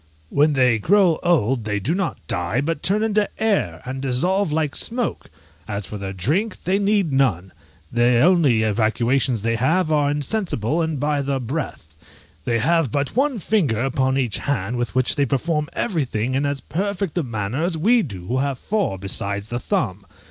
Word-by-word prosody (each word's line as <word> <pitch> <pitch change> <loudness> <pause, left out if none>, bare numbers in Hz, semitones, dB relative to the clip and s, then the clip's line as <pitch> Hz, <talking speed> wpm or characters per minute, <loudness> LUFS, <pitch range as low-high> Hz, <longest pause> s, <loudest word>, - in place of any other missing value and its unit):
When 150 +1 +3
they 125 -4 +3
grow 185 - +3
old 135 -9 +2
they 105 -1 -1
do 115 - -1
not 190 -1 -1
die, 90 +8 -1
but 150 +2 -2
turn 210 +3 +1
into 210 -1 +1
air, 195 - 0
and 130 +1 -5
dissolve 165 +8 +1
like 155 -2 -1
smoke! 240 0 -2 0.4
As 100 -1 -4
for 105 +3 -7
their 95 -1 -4
drink, 155 - -1
they 190 +2 +1
need 200 -5 +1
none; 100 -10 +1 0.4
the 120 0 +3
only 150 -10 +4
evacuations 115 +2 +1
they 115 0 0
have 160 +7 +1
are 145 -2 +2
insensible, 150 - -1
and 160 -3 -2
by 145 0 0
their 140 -1 -1
breath. 120 - -5 0.5
They 120 -1 +1
have 160 +2 +2
but 140 +1 -2
one 270 0 +1
finger 170 - +1
upon 130 0 +1
each 120 -7 0
hand, 125 -5 -2
with 120 +1 -3
which 130 -1 +3
they 140 -1 +2
perform 150 +3 -1
everything 130 - -1
in 140 +2 +1
as 140 -2 -2
perfect 195 0 -3
a - - +2
manner 115 0 -3
as 170 -1 -1
we 230 +9 +4
do 100 - -6
who 125 +7 -1
have 140 -1 -1
four 200 - -1
besides 100 +2 -4
the 120 - -2
thumb. 100 -4 -2
135 Hz, 180 wpm, -22 LUFS, 115-170 Hz, 0.5 s, only